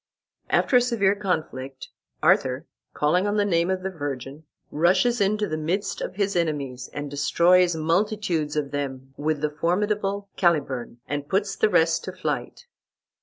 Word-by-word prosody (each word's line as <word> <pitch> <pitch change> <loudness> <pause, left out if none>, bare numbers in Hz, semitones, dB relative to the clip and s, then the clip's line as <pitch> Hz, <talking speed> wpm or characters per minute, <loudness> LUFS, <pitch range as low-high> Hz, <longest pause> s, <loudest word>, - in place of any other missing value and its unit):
After 250 - +4
a - - +5
severe 225 -6 +2
conflict, 155 -9 -4 0.3
Arthur, 130 +4 +3 0.3
calling 180 +7 +1
on 205 +1 0
the 205 - +3
name 170 -2 +1
of 185 0 -1
the 190 - -2
Virgin, 145 -2 -6 0.3
rushes 185 +9 +2
into 210 +1 +1
the 155 -1 -3
midst 180 +7 -2
of - - -4
his 200 -1 0
enemies, 140 -7 -2
and 145 0 -5
destroys 170 +5 +3
multitudes 170 -1 0
of 145 -2 -1
them 135 -2 -4
with 150 0 -1
the 150 -1 0
formidable 200 +5 -1
Caliburn, 140 -9 0
and 145 0 -4
puts 195 +1 0
the 215 - +2
rest 165 -3 +3
to - - -5
flight. - - -4
170 Hz, 155 wpm, -25 LUFS, 145-200 Hz, 0.3 s, a